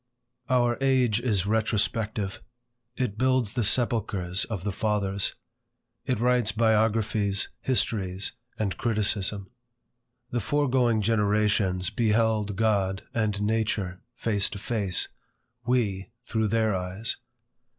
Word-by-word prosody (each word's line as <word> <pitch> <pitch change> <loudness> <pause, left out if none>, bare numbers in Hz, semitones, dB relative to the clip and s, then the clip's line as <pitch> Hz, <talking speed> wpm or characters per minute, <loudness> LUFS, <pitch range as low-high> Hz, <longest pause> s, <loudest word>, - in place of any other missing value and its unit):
OUR 120 -2 +2
age 130 -5 +3
is 105 -7 +1
retrospective. 110 -1 -1 0.6
It 115 -5 -2
builds 130 -4 +2
the 120 - 0
sepulchres 105 -5 +1
of 105 -6 -5
the 105 - -1
fathers. 100 -1 -1 0.7
It 125 -4 0
writes 120 -2 +3
biographies, 110 -2 +1
histories, 100 -7 0 0.3
and 100 -4 -2
criticism. 105 -3 +1 0.8
The 120 - 0
foregoing 125 -3 +1
generations 105 -3 +1
beheld 110 -3 +1
God 100 -3 +1
and 105 -3 0
nature 105 -4 -1
face 105 -3 +1
to - - -7
face; 100 -3 0 0.6
we, 100 -7 0
through 110 -1 0
their 110 0 +1
eyes. 90 +4 -3
110 Hz, 105 wpm, -27 LUFS, 100-115 Hz, 0.8 s, age